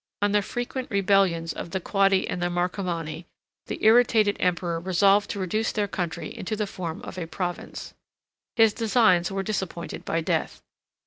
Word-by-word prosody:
85 - - +5
On - - -2
the 205 0 +3
frequent 245 +4 -4
rebellions 195 -5 +2
of - - -6
the 190 - -2
Quadi 195 0 +2
and 180 - -3
Marcomanni, 175 -2 -2 0.4
the - - -4
irritated 220 -2 +5
emperor 175 -2 0
resolved 195 +3 +3
to 200 - -4
reduce 215 +4 -1
their 205 -2 -1
country 170 -4 -4
into 215 +4 -3
the 210 0 -1
form 180 -3 -6
of - - -7
a 165 - -4
province. 175 0 -5 0.6
His 225 -2 +5
designs 220 -7 +3
were 195 0 -2
disappointed 190 -4 -4
by 165 - -1
death. 160 - -2
190 Hz, 165 wpm, -25 LUFS, 175-210 Hz, 0.6 s, 85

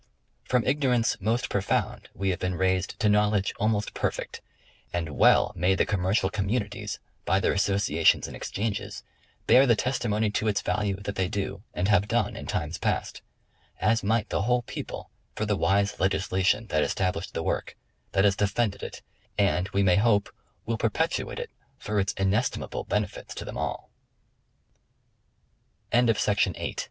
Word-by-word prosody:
From 125 -2 +2
ignorance 130 -4 +2
most 115 +5 0
profound 100 -1 -1
we 95 0 -1
have 90 - -3
been 90 0 -1
raised 95 +1 0
to 105 - +3
knowledge 105 -1 +2
almost 105 0 0
perfect; - - -3 0.5
and 85 -2 -2
well - - +5
may 90 +3 +2
the - - +2
commercial 95 0 +1
communities 105 0 -2 0.3
by 95 - +2
their - - +1
associations 100 0 +2
and - - -7
exchanges 105 0 -4 0.4
bear 135 +2 +6
the 120 - +5
testi 125 0 -1
mony 105 0 +1
to 105 +1 -1
its 105 -1 +1
value 100 -2 0
that 100 0 -4
they 95 -2 0
do, 100 -1 -3
and 90 - 0
have 105 -1 +3
done - - 0
in - - -7
times 80 +3 -2
past; - - -2 0.6
as 110 +4 +2
might 110 +1 +1
the - - 0
whole 125 +3 +1
people - - -7 0.2
for 110 - -1
the 105 -1 +1
wise 100 +2 +1
legislation 95 +2 +1
that 80 - +2
established 90 +4 -1
the - - -1
work, - - -2 0.4
that 95 - +3
has 100 -1 +4
defended 105 +1 0
it, - - -7 0.3
and 100 -2 +2
we 100 - +1
may 90 -2 +4
hope 105 -1 +2 0.3
will 115 -1 -2
perpetuate - - -1
it - - -5 0.3
for 105 0 -2
its 95 0 0
inestim 100 +6 0
100 Hz, 145 wpm, -27 LUFS, 95-110 Hz, 0.6 s, bear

